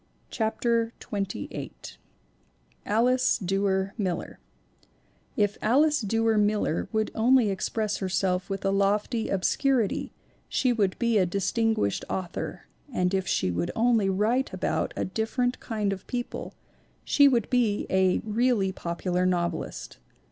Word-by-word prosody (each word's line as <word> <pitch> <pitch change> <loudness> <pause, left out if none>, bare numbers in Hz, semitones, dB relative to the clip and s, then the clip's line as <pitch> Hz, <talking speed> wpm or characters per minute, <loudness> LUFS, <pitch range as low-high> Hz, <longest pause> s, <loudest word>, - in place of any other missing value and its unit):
CHAPTER 230 0 0
XXVIII 195 - -4 1.2
ALICE 250 +4 +3
DUER 195 0 0
MILLER 185 -4 -3 1.0
IF 205 -2 +1
Alice 295 +5 +3
Duer 225 +1 +1
Miller 205 -5 0
would 220 -1 0
only 235 -1 +4
express 210 +2 -2
herself 185 -1 -1
with 195 0 -4
a 195 - +2
lofty 205 +4 +1
obscurity 230 +4 +1 0.4
she 250 -2 +2
would 200 -5 0
be 235 -3 +2
a 185 - +2
Distin 200 +5 0
guished 100 0 -1
Author 180 -2 -4 0.3
and 180 -5 0
if 190 -1 0
she 90 - +1
would 85 0 -2
only 225 -4 +3
write 220 +8 +1
about - - -1
a - - 0
different 235 +5 -1
kind 210 -4 -2
of 190 - -9
people 245 -1 -5 0.5
she 285 -1 +5
would 240 -5 +2
be 235 -5 +2
a 190 -1 +2
really 220 -3 +1
popu 170 +1 -4
lar 180 +1 +2
novelist. 175 -2 -3
210 Hz, 130 wpm, -27 LUFS, 190-230 Hz, 1.2 s, she